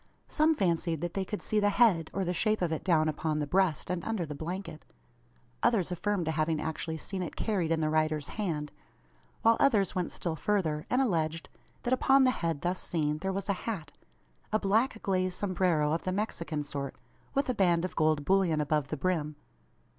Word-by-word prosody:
Some 315 Hz, +1 st, +3 dB
fancied 170 Hz, -, 0 dB
that 175 Hz, -1 st, -3 dB
they 195 Hz, -, -1 dB
could 210 Hz, +2 st, -5 dB
see 215 Hz, -, +1 dB
the 205 Hz, 0 st, +3 dB
head, 200 Hz, -7 st, +3 dB
or 195 Hz, -1 st, -2 dB
the 175 Hz, -, -1 dB
shape 215 Hz, +1 st, +1 dB
of 170 Hz, -, 0 dB
it, 160 Hz, -, -2 dB
down 160 Hz, -4 st, +3 dB
upon 155 Hz, 0 st, -1 dB
the 150 Hz, -, 0 dB
breast, 180 Hz, 0 st, +1 dB
and 175 Hz, -2 st, -2 dB
under 220 Hz, -6 st, -2 dB
the 150 Hz, -, -6 dB
blanket; 165 Hz, +2 st, -6 dB, 0.8 s
others 205 Hz, -7 st, +2 dB
affirmed 185 Hz, 0 st, -1 dB
to 160 Hz, -, 0 dB
having 155 Hz, 0 st, 0 dB
actually 160 Hz, +1 st, -3 dB
seen 190 Hz, +4 st, -5 dB
it 175 Hz, -, -5 dB
carried 185 Hz, -7 st, -1 dB
in 160 Hz, -1 st, +1 dB
the 155 Hz, -, +1 dB
rider's 155 Hz, -1 st, 0 dB
hand; 160 Hz, -8 st, -3 dB, 0.7 s
while 230 Hz, 0 st, +5 dB
others 215 Hz, -8 st, +3 dB
went 180 Hz, -2 st, -2 dB
still 170 Hz, -3 st, -3 dB
further, 160 Hz, -4 st, -1 dB
and 255 Hz, +2 st, +3 dB
alleged: 165 Hz, -7 st, -1 dB, 0.3 s
that 245 Hz, -, +1 dB
upon 270 Hz, +1 st, +5 dB
the 255 Hz, -, +5 dB
head 165 Hz, -, -2 dB
thus 180 Hz, +1 st, -1 dB
seen 150 Hz, -2 st, -1 dB
there 190 Hz, +4 st, -2 dB
was 195 Hz, 0 st, -3 dB
a 200 Hz, -, +2 dB, 0.2 s
hat 165 Hz, -10 st, -4 dB, 0.6 s
a 215 Hz, -, +3 dB
black 220 Hz, +4 st, +1 dB
glaze 185 Hz, -2 st, 0 dB
sombrero 180 Hz, -6 st, +1 dB
of 165 Hz, -, -1 dB
the 185 Hz, -, -1 dB
Mexican 170 Hz, -6 st, -2 dB
sort, 140 Hz, -1 st, -5 dB, 0.4 s
with 275 Hz, -, +1 dB
a 255 Hz, -, +1 dB
band 175 Hz, -5 st, +2 dB
of 185 Hz, -, -6 dB
gold 155 Hz, -2 st, +2 dB
bullion 185 Hz, -4 st, +3 dB
above 150 Hz, -1 st, 0 dB
the 155 Hz, -, -4 dB
brim! 155 Hz, -1 st, -1 dB
175 Hz, 200 wpm, -30 LUFS, 155-200 Hz, 0.8 s, while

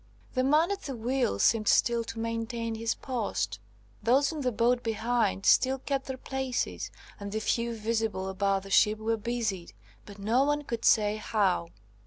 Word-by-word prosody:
The 255 Hz, -, +1 dB
man 305 Hz, +7 st, +3 dB
at 400 Hz, 0 st, -3 dB
the 270 Hz, -, -5 dB
wheel 240 Hz, -, 0 dB
seemed 215 Hz, -, +2 dB
still 235 Hz, -1 st, +3 dB
to 230 Hz, 0 st, -7 dB
maintain 230 Hz, 0 st, -3 dB
his 225 Hz, +1 st, -1 dB
post; 200 Hz, -, -3 dB, 0.4 s
those 270 Hz, +4 st, +3 dB
in 310 Hz, -2 st, -5 dB
the 255 Hz, -2 st, 0 dB
boat 240 Hz, +2 st, +2 dB
behind 225 Hz, -3 st, 0 dB
still 265 Hz, +1 st, +4 dB
kept 270 Hz, 0 st, -3 dB
their 265 Hz, -1 st, -4 dB
places, 265 Hz, -1 st, -3 dB, 0.3 s
and 200 Hz, 0 st, -6 dB
the 220 Hz, -, -1 dB
few 235 Hz, +2 st, -1 dB
visible 220 Hz, -3 st, -1 dB
about 195 Hz, 0 st, 0 dB
the 195 Hz, -, -10 dB
ship 210 Hz, +2 st, +4 dB
were 220 Hz, +1 st, 0 dB
busied, 220 Hz, -5 st, -3 dB, 0.3 s
but 205 Hz, -1 st, -11 dB
no 225 Hz, +6 st, +2 dB
one 295 Hz, +1 st, 0 dB
could 235 Hz, -5 st, -4 dB
say 210 Hz, -1 st, +4 dB
how. 200 Hz, -5 st, 0 dB
230 Hz, 175 wpm, -29 LUFS, 210-255 Hz, 0.4 s, still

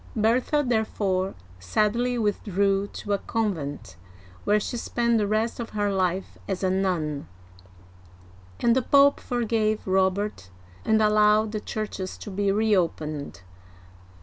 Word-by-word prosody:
Bertha 245 Hz, +7 st, +2 dB
therefore 200 Hz, -5 st, 0 dB, 0.2 s
sadly 215 Hz, -, 0 dB
withdrew 200 Hz, -2 st, 0 dB
to 205 Hz, 0 st, -4 dB
a 200 Hz, -, +1 dB
convent, 170 Hz, -, -3 dB, 0.5 s
where 210 Hz, +1 st, +3 dB
she 210 Hz, -, -4 dB
spent 235 Hz, -1 st, 0 dB
the 205 Hz, -, +1 dB
rest 220 Hz, +3 st, 0 dB
of 235 Hz, -, -4 dB
her 205 Hz, -1 st, +1 dB
life 185 Hz, 0 st, -1 dB
as 195 Hz, -1 st, -3 dB
a 185 Hz, -, +2 dB
nun, 170 Hz, -, -1 dB, 1.3 s
and 235 Hz, 0 st, +3 dB
the 260 Hz, -, +3 dB
Pope 280 Hz, +2 st, +5 dB
forgave 225 Hz, -3 st, -1 dB
Robert 190 Hz, -, 0 dB, 0.3 s
and 220 Hz, 0 st, +3 dB
allowed 210 Hz, 0 st, +4 dB
the 215 Hz, -, -2 dB
churches 210 Hz, -4 st, -5 dB
to 205 Hz, -, -8 dB
be 200 Hz, +1 st, 0 dB
reopened. 165 Hz, -, -1 dB
210 Hz, 125 wpm, -25 LUFS, 190-220 Hz, 1.3 s, Pope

